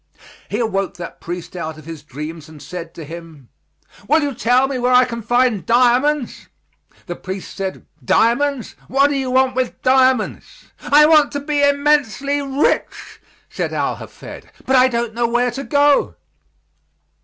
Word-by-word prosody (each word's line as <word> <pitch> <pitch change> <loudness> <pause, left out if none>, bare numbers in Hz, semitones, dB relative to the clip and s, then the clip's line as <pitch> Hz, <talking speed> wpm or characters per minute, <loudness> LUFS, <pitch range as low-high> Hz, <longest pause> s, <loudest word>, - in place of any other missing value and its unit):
He - - -2
awoke 195 -5 -1
that 175 -1 -9
priest 175 +1 -7
out 160 -3 -5
of 155 - -14
his 165 -2 -8
dreams 150 +3 -8
and 155 -1 -13
said 165 +3 -8
to 165 - -8
him, 160 -4 -11 0.6
"Will 310 +1 +3
you 285 -1 -2
tell 250 +3 +2
me 270 -2 -3
where 245 +1 +1
I 250 0 +6
can 235 -2 -6
find 240 -3 +1
diamonds?" 250 - +1 0.6
The 175 - -5
priest 190 +1 -7
said, 195 -1 -5 0.2
"Diamonds? 240 - +1
What 275 +2 +3
do - - -1
you 265 -2 -2
want 260 0 +2
with 255 -1 -2
diamonds?" 255 -3 +1
"I 295 +1 +5
want 305 -2 +5
to 285 - -2
be 290 0 -1
immensely 285 -1 +1
rich," 275 +1 -2 0.3
said - - -4
Al - - -1
Hafed, - - -11 0.2
"but 265 - +2
I 255 0 +6
don't 235 -2 -2
know 235 +1 0
where 240 +1 +1
to 270 +4 -6
go." 285 +3 +2
245 Hz, 165 wpm, -19 LUFS, 185-275 Hz, 0.6 s, I